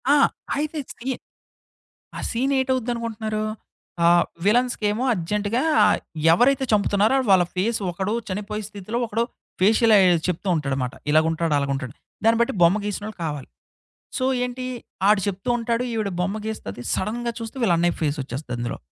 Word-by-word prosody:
ఆ! - - +5 0.5
ఈ 305 -1 -3
సీ 245 - -10 1.1
ఆహ్, - - -4
సీన్ 260 +4 0
ఏటవుద్దనుకుంటున్నారు? 230 -4 -2 0.6
ఆహ్, 175 0 +5 0.2
విలన్స్‌కేమో 225 0 +2
అర్జెంట్‌గా 210 +6 -1 0.7
ఎవరైతే 265 +9 +4
చంపుతున్నారో, 205 +3 +3
వాళ్ళ 185 -2 +6
ఫేస్ 220 +5 +1
ఒకడో, 190 +5 -2
చనిపోయే 210 +2 -4
స్థితిలో, 210 +3 -5
ఒకడో 225 +2 0 0.4
ఫేషియల్ 220 +4 +4
ఐ - - +6 0.3
చెప్తూ 180 +2 -2
ఉంటాడమాట. 135 -4 -2 0.2
ఇలాగుంటాడు, 160 +1 +2
అలాగా 140 -1 -1
ఉంటాడు. 130 -1 -5 0.3
దాన్ని 225 0 +4
బట్టి 235 - +2
బొమ్మ 175 +5 +5
గేసినోళ్ళు 210 +1 -4
కావాలి. 145 -4 -4 0.7
సో 255 - -1 0.2
ఏంటి, 250 +1 -4 0.4
ఆడు 210 -1 +5
చెప్తూ 190 +2 -5
ఉంటాడు. 235 +1 -1
ఈవిడ 215 -3 -1
బొమ్మ 195 +4 -1
గీస్తది. 120 - -5
సడెన్‌గా 235 +4 -2
చూస్తే 225 +3 -7
వీళ్ళ 185 -7 +4
అన్నై 175 +1 +2
ఫేస్ 150 -1 0
వచ్చేస్తది 130 0 -6
అందులో. 120 0 -3
210 Hz, 140 wpm, -23 LUFS, 170-230 Hz, 1.1 s, వాళ్ళ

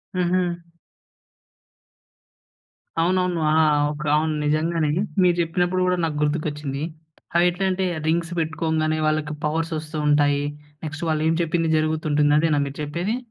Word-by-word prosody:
హుహు. 175 -1 0 2.4
అవునవును. 180 0 +1
ఆ! 160 - +4 0.3
ఓకే. 150 0 -5
అవును. 155 +1 +1
నిజంగానే. 155 +1 +1 0.3
మీరు 175 -1 +4
జెప్పినప్పుడు 175 +2 0
కూడా 180 - +2
నాకు 155 -2 -1
గుర్తుకొచ్చింది. 150 -2 -2 0.6
అయి 175 - +5
ఎట్లాంటే 190 +1 -1 0.2
రింగ్స్ 170 +1 0
పెట్టుకోగానే 160 -1 0
వాళ్ళకి 155 0 0
పవర్స్ 165 +2 -1
వస్తూ 155 +1 -6
ఉంటాయి. 145 -1 +3 0.4
నెక్స్ట్ 155 +2 -5
వాళ్ళేం 155 +1 +1
చెప్పింది 165 0 0
జరుగుతుంటుంది. 155 -1 +1
అదేనా 155 -2 +2
మీరు 140 - -8
చెప్పేది? 170 +10 -2
160 Hz, 115 wpm, -23 LUFS, 150-175 Hz, 2.4 s, అయి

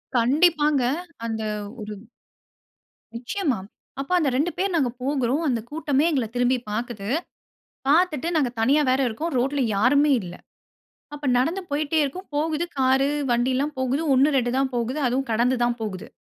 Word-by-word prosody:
கண்டிப்பங்க 295 +2 +3 0.4
அந்த 220 -1 -3 0.4
ஒரு 210 0 -6 1.2
நிச்சயமா, 260 - -1 0.4
அப்போ 320 +6 -3
அந்த 290 -4 +2
2 315 +6 +1
பேர் 380 0 0
நாங்க 270 -6 +2
போகிறோம். 275 +2 0
அந்த 240 -4 +1
கூட்டமே 295 -1 +1
எங்கள 260 -6 +1
திரும்பி 245 +1 +2
பாக்கிது. 215 -1 -4 0.8
பாத்துட்டு 325 0 +3
நாங்க 275 -6 +2
தனியா 285 +6 +4
வேற 260 +1 +2
இருக்கோம். 310 +9 -3
ரோட்ல 270 +3 0
யாருமே 280 +7 +4
இல்ல. 175 -1 -8 0.8
அப்ப 295 0 -7
நடந்து 330 +10 0
போயிட்டே 300 +2 0
இருக்கோம். 365 +8 -5
போகுது 315 +2 0
காரு 265 +2 +3 0.2
வண்டில்லாம் 260 +5 0
போகுது. 260 +4 0
1 270 +3 +5
2 245 -1 +1
தான் 270 -1 +1
போகுது. 245 +5 -1
அதுவும் 260 +2 -1
கடந்து 245 +3 +2
தான் 240 0 0
போகுது. 210 -1 -5
270 Hz, 145 wpm, -24 LUFS, 240-300 Hz, 1.2 s, 1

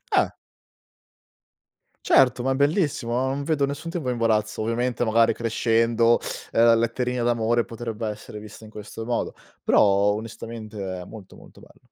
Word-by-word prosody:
Eh. - - +3 1.8
Certo, 125 -2 +4
ma 135 0 +1
è - - -2
bellissimo, 145 - +1
non 130 +3 -1
vedo 145 -2 +1
nessun 145 +4 -5
tipo 155 -8 -3
imbarazzo. 110 -3 0
Ovviamente, 120 +2 -1
magari 115 0 +3
crescendo, 115 0 +2 0.4
uhm, 115 - +4
la 115 0 +7
letterina 120 +2 0
d'amore 120 0 +1
potrebbe 115 -1 -5
essere 105 0 -7
vista 105 +1 -12
in 110 - -11
questo 105 +2 -8
modo, 120 0 -2 0.3
però, - - +5 0.3
onestamente, 110 0 -7 0.2
è - - -7
molto, 105 -3 -12
molto - - -16
bello. - - -20
115 Hz, 145 wpm, -24 LUFS, 110-125 Hz, 1.8 s, la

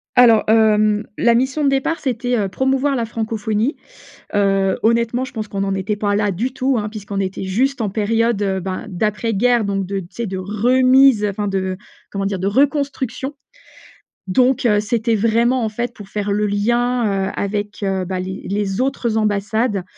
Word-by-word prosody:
Alors, 235 -3 +6
hem, 215 -1 +3
la 235 - +4
mission 265 +4 0
de 275 - +4
départ 275 +5 0
c'était, 245 -2 -1
heu, 200 -2 -1
promouvoir 265 +4 0
la 235 -2 -1
francophonie. 220 +2 -2 0.6
Heu, 195 -1 +2
honnêtement, 235 +2 +1
je 260 - -9
pense 215 -3 -5
qu'on 195 -1 -3
n'en 195 0 -1
était 200 +2 -2
pas 205 -1 0
là 205 -1 +1
du 235 +8 -2
tout, 260 -2 0
hein, 210 0 -2
puisqu'on 205 -2 -6
était 190 0 -3
juste 250 +8 0
en 210 -3 -1
période, 225 +1 +1
heu, 190 -1 0
bah, 185 0 -4
d'après 210 +4 -1
guerre 240 +1 +2
donc 195 -1 -1
de 200 0 -3
tu 170 - -10
sais, 235 -1 -4
de 190 0 -4
remise, 250 +4 +4
enfin 205 +1 -3
de, 190 -1 -2 0.3
comment 195 -1 -2
dire, 195 -2 -2
de 190 - -2
reconstruction. 275 +2 0 0.9
Donc, 255 +5 +2
heu, 210 -2 +3
c'était 225 +1 0
vraiment, 230 +3 +2
en - - 0
fait, 240 +3 -3
pour 205 -2 -11
faire 205 -1 -2
le 210 +1 +1
lien, 215 -1 0
heu, - - -5
avec, 205 +1 -3
heu, 190 -1 -1
bah, 185 0 -3
les 190 +1 -6
les 200 +1 -1
autres 240 -4 -1
ambassades. 210 -1 0
215 Hz, 185 wpm, -19 LUFS, 200-245 Hz, 0.9 s, Alors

